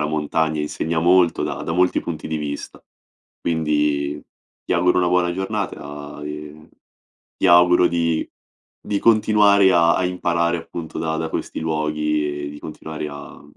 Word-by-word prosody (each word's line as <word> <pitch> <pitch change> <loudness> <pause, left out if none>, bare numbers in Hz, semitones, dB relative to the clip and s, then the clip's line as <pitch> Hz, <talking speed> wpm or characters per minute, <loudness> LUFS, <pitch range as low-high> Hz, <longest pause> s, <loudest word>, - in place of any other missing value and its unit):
la 75 - 0
montagna 80 0 -1
insegna 80 +2 -2
molto, 90 0 +3
da - - -4
da - - -4
molti 90 +1 +2
punti 80 -2 -6
di 80 - -2
vista. 75 -1 -6 0.6
Quindi 75 -3 0 0.4
ti - - -2
auguro 90 +1 +3
una 90 - +2
buona 90 -1 +2
giornata, 85 -7 -5
e 75 +1 -8 0.7
ti - - +1
auguro 90 0 +6
di 85 -1 0 0.5
di 100 -1 -2
continuare 105 -3 +4
a 85 -1 +4
a 95 - 0
imparare 85 -1 0
appunto 80 -1 -7
da 80 0 -2
da 80 0 -3
questi - - -4
luoghi 75 -2 -1
e - - -5
di 75 - -10
continuare 80 0 -7
a 70 0 -11
80 Hz, 150 wpm, -21 LUFS, 75-90 Hz, 0.7 s, auguro